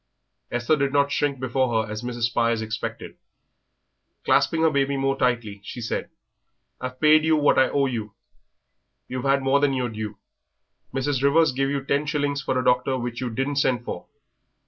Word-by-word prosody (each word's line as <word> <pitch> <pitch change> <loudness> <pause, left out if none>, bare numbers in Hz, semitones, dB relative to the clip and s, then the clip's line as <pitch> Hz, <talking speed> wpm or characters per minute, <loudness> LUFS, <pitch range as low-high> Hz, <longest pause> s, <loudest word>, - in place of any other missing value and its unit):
Esther 120 +5 +1
did 140 -1 0
not 140 0 +2
shrink 140 -2 0
before 125 -3 0
her 105 - -9
as 105 +1 -4
Mrs. 120 -1 -5
Spires 115 -1 +1
expected. 110 0 -5 1.1
Clasping 160 0 +3
her 160 - +4
baby 140 -1 +1
more 135 0 +1
tightly, 115 -6 -1
she 120 - -8
said: 115 - -3 0.7
"I've 130 0 -6
paid 155 0 +5
you 160 0 +3
what 145 -2 +3
I 130 - +4
owe 140 -1 +1
you, 110 -6 -4 0.9
you've 125 0 -5
had 135 0 +2
more 135 +1 +3
than 140 -1 +2
your 125 -2 -1
due. 110 -1 -6 0.7
Mrs. 135 0 -1
Rivers 160 +4 +4
gave 135 +1 0
you 140 -1 -2
ten 145 +2 0
shillings 145 -2 -1
for 130 -2 -1
a 125 - -1
doctor 130 +1 +2
which 120 -1 -4
you 125 - -2
didn't 135 +5 -2
send 125 -4 +1
for. - - -6
130 Hz, 180 wpm, -24 LUFS, 120-140 Hz, 1.1 s, paid